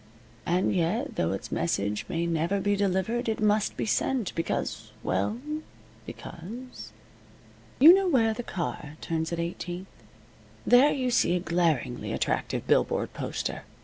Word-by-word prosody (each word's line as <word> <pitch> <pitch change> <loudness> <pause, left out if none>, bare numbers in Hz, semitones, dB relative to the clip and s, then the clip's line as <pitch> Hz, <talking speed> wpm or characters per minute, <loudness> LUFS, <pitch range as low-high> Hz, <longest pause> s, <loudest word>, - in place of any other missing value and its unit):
And 180 +2 +2
yet, 190 - 0
though - - 0
its - - -5
message 105 -11 -1
may 170 +1 -1
never 170 +4 0
be 205 +1 +1
delivered, 200 +5 0
it 220 - -1
must 210 -1 +2
be - - -1
sent, 235 0 0
because 110 -8 -3
well, 100 - 0 0.7
because 235 +10 -9 0.9
You 310 +6 +10
know 385 0 +3
where 230 -9 +3
the 220 - -4
car 170 -8 -5
turns 160 0 -2
at 170 - -2
Eighteenth? 175 +2 -4 0.8
There 255 +4 +6
you 255 -2 0
see 180 -7 +3
a - - +1
glaringly 165 -8 0
attractive - - -1
billboard - - +1
poster. - - -3
185 Hz, 140 wpm, -27 LUFS, 165-235 Hz, 0.9 s, You